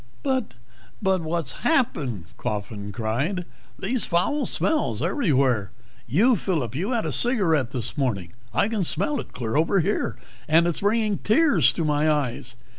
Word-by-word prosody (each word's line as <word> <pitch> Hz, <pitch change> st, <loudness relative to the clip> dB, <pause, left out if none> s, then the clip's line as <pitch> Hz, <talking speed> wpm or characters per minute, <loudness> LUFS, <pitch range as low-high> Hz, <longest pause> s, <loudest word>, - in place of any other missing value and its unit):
"But 260 Hz, -, -1 dB, 0.4 s
what's 170 Hz, -, 0 dB
happened?" 140 Hz, -, 0 dB
Coffin 105 Hz, -1 st, -4 dB
cried. 130 Hz, -, -2 dB, 0.3 s
"These 220 Hz, +4 st, -1 dB
foul 260 Hz, +12 st, +1 dB
smells, 315 Hz, -1 st, 0 dB
everywhere. 135 Hz, -, +1 dB, 0.4 s
You, 210 Hz, -, +4 dB
Phillip, 155 Hz, -, -2 dB
you 175 Hz, -, -2 dB
had 235 Hz, -3 st, 0 dB
a -, -, -1 dB
cigarette 175 Hz, -, +2 dB
this 125 Hz, -4 st, -2 dB
morning. 105 Hz, -, -2 dB, 0.2 s
I 115 Hz, -, +2 dB
can 220 Hz, -3 st, -1 dB
smell 295 Hz, -, 0 dB
it -, -, -8 dB
clear 115 Hz, -1 st, -4 dB
over 165 Hz, +6 st, +3 dB
here, 195 Hz, +6 st, -1 dB, 0.3 s
and 165 Hz, +2 st, +5 dB
it's 170 Hz, -2 st, -1 dB
bringing 210 Hz, 0 st, +1 dB
tears 290 Hz, +8 st, +4 dB
to 165 Hz, -, -2 dB
my 150 Hz, +1 st, +2 dB
eyes. 125 Hz, -5 st, -1 dB
165 Hz, 145 wpm, -24 LUFS, -, 0.4 s, and